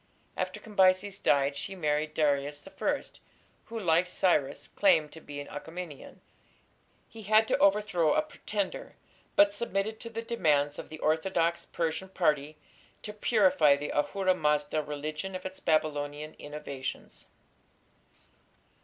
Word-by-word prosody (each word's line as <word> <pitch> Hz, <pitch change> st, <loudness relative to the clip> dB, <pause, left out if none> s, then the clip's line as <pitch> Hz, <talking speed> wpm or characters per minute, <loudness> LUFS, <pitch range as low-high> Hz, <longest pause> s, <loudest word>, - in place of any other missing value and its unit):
After -, -, -3 dB
Cambyses 195 Hz, -2 st, +2 dB
died 140 Hz, 0 st, +2 dB
she 195 Hz, -, -5 dB
married 150 Hz, -2 st, -1 dB
Darius 145 Hz, +1 st, 0 dB
I, -, -, -1 dB, 0.6 s
who, 230 Hz, 0 st, -6 dB
like 175 Hz, -2 st, +3 dB
Cyrus, 150 Hz, -7 st, +1 dB
claimed 160 Hz, -, +3 dB
to 160 Hz, -, -11 dB
be 145 Hz, -1 st, -8 dB
an 145 Hz, -, -7 dB
Achaemenian. 160 Hz, 0 st, -8 dB, 0.9 s
He 225 Hz, -, -12 dB
had 215 Hz, +2 st, +4 dB
to -, -, +3 dB
overthrow 195 Hz, -6 st, +3 dB
a -, -, +3 dB
pretender, 210 Hz, -10 st, -4 dB, 0.4 s
but 300 Hz, -1 st, +6 dB
submitted 220 Hz, -2 st, -2 dB
to 230 Hz, -, -7 dB
the 230 Hz, 0 st, -5 dB
demands 150 Hz, -, +1 dB
of -, -, -8 dB
the 155 Hz, -, -8 dB
orthodox 170 Hz, +2 st, 0 dB
Persian 170 Hz, +3 st, -2 dB
party 155 Hz, -4 st, 0 dB, 0.5 s
to 210 Hz, -, -6 dB
purify 190 Hz, -9 st, +4 dB
the 145 Hz, +1 st, -5 dB
Ahura 185 Hz, +5 st, +1 dB
Mazda 150 Hz, -2 st, +1 dB
religion 150 Hz, +5 st, -5 dB
of 185 Hz, -, -6 dB
its 190 Hz, 0 st, -6 dB
Babylonian 150 Hz, -1 st, -1 dB
innovations. 145 Hz, -3 st, -7 dB
165 Hz, 130 wpm, -29 LUFS, 150-195 Hz, 0.9 s, but